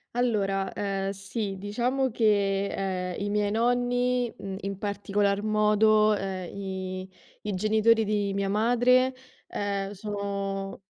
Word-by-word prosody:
Allora, 195 -6 0
ehm, 195 -1 -2
sì, 195 +1 -4
diciamo 245 +6 0
che, 200 -3 +2
ehm, 185 -2 -2
i 205 - -1
miei 205 0 +1
nonni, 245 +1 +1
mhmm, 195 -1 -6
in 195 0 -4
particolar 205 0 0
modo, 215 0 +4
ehm, 190 -2 -4
i 190 -1 -5 0.4
i 210 - -1
genitori 220 +3 +3
di 205 -1 0
mia 195 0 -1
madre, 245 +4 +3 0.3
ehm, 200 -1 -2
sono 200 -1 -4
205 Hz, 120 wpm, -27 LUFS, 195-220 Hz, 0.4 s, modo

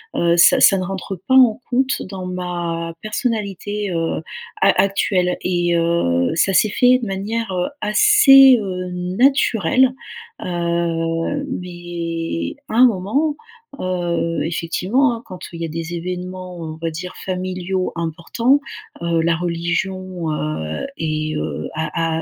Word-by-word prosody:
heu, 170 0 +2
ça 170 - +6
ça 195 - +7
ne 185 - -2
rentre 190 0 -5
pas 260 - +3
en 250 -4 +6
compte 260 +1 0
dans 190 -2 -6
ma 175 -2 -4
personnalité, 210 -3 -3
heu, 165 -1 -1 0.4
a - - +5
actuelle. 190 -2 +1
Et, 175 -1 0
heu, 165 - +1
ça 190 +3 +2
s'est 215 - +4
fait 250 +4 +4
de 235 - -4
manière, 205 +3 -3
heu, 180 -1 -1
assez, 270 - +7
heu, 185 -2 -4
naturelle. 230 +5 +2 0.5
Heu, 170 +7 -1 0.2
mais 170 - -4
à - - -4
un 250 +2 +7
moment, 235 +10 0 0.4
heu, 175 -3 -1
effectivement, 185 - 0
hein, 230 - -10
quand, 185 - -9
heu, 170 - -10
il 170 - -8
y - - -1
a - - -3
des 165 +2 -5
événements, 180 +1 -6
on 160 -1 -6
va 165 - -2
dire, 180 +3 -6
familiaux 185 0 -2
importants, 170 - +1 0.4
heu, 170 -1 0
la 165 0 +2
religion, 175 0 -2
heu, 80 - -3
est, 155 -1 -2
heu, 75 0 -4
a 160 +1 -1
180 Hz, 140 wpm, -20 LUFS, 165-205 Hz, 0.5 s, ça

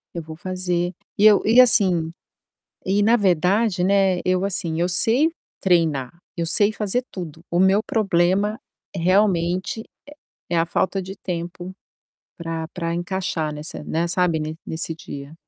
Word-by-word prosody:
Eu 170 - -4
vou 160 0 -10
fazer. 180 -1 -2 0.2
E 205 - +3
eu 210 -2 +7
e 230 +4 +5
assim 185 -9 +5 0.8
e 200 +2 +2
na 230 +3 +4
verdade, 190 +1 +1
né, 190 -1 +2
eu 185 +1 +1
assim, 170 -4 -2
eu 175 - +1
sei 235 - +3 0.3
treinar, 165 -6 +1 0.2
eu 170 -1 -2
sei 205 +5 +3
fazer 215 +4 -1
tudo. 165 -4 -8
O 175 - +1
meu 190 +3 +4
problema 200 0 +1 0.4
realmente 185 +2 +1
é - - -13 0.7
é 170 - +1
a 165 - +1
falta 190 +3 -1
de 190 +1 -8
tempo 175 0 -6 0.7
pra 165 -1 -5
pra 170 -1 -4
encaixar 175 -3 -3
nessa, 150 +1 -7
né, 165 +3 -1
sabe, 175 -2 +1
ne 155 +1 -4
nesse 160 0 -3
dia. 140 -2 -9
180 Hz, 150 wpm, -22 LUFS, 165-195 Hz, 0.8 s, eu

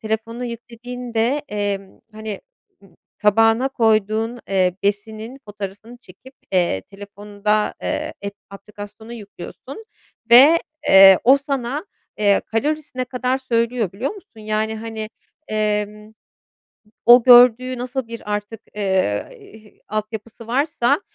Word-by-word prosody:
Telefona 220 +2 -4
yüklediğinde, 240 +2 -3
emm, 200 -2 -4
hani, 215 -1 -7 0.4
ııı, 195 - -21 0.2
tabağına 225 +4 +3
koyduğun, 220 -1 0
eee, 185 -2 +1
besinin 220 +5 -3
fotoğrafını 205 +3 -8
çekip, 260 +2 -17 0.2
eee, 175 - +1
telefonda, 205 - -3
eee, - - -3
ep 200 0 -5 0.2
aplikasyonu 205 +3 -11
yüklüyorsun 235 - -10 0.5
ve, 280 +8 +8 0.3
eee, 195 -1 +9
o 265 +3 +7
sana, 275 +3 -4 0.3
eee, 205 -1 +3
kalorisine 275 +2 -2
kadar 250 +1 -2
söylüyor, 235 -5 -1
biliyor 240 +8 -3
musun? 395 - -14
Yani, 215 +1 -2
hani, 220 -1 -6 0.4
emm, 210 0 -2 0.9
o 240 +1 +8
gördüğü 250 +1 +6
nasıl 250 0 -4
bir 230 -2 -6
artık, 210 +2 -4
eee, 190 - 0
hi 215 -1 -17
altyapısı 215 +1 -6
varsa, 260 - +1
220 Hz, 110 wpm, -20 LUFS, 205-245 Hz, 0.9 s, eee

